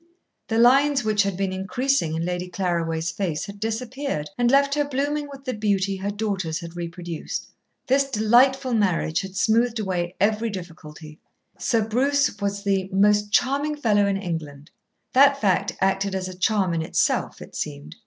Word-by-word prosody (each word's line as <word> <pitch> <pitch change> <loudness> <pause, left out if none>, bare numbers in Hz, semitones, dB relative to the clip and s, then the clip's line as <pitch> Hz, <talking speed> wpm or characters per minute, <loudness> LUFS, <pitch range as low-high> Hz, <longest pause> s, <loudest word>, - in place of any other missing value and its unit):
The 225 - -1
lines 270 +3 +5
which 215 -1 +2
had 195 -2 -1
been 195 -1 -1
increasing 190 - 0
in 165 +1 -2
Lady 180 0 -3
Claraway's 170 -3 -1
face 170 -7 -3
had 200 0 -10
disappeared, 225 - -3
and 240 -1 +2
left 280 +1 +4
her 295 0 +2
blooming 290 +1 -2
with 275 -1 -11
the 255 - -2
beauty 200 -2 0
her 195 +2 -3
daughters 200 -6 -2
had 170 0 -9
reproduced. 170 -1 -5 0.4
This 275 +1 +2
delightful 250 +3 +3
marriage 180 -7 +1
had 190 -1 -8
smoothed 230 +4 +2
away 180 -4 -2
every 220 +3 +1
difficulty. 160 -5 -9 0.4
Sir 225 -5 +1
Bruce 270 -1 +1
was 200 0 -2
the 195 -2 0
"most 205 +1 +3
charming 280 +7 +1
fellow 210 -8 +2
in 195 -1 0
England." 155 -6 -6 0.4
That 280 +1 +6
fact 195 -1 +1
acted 195 0 +1
as 185 -1 -2
a 185 - -7
charm 190 -1 +1
in 165 - 0
itself, 160 - 0
it - - -12
seemed. 75 +1 -6
200 Hz, 165 wpm, -24 LUFS, 180-245 Hz, 0.4 s, That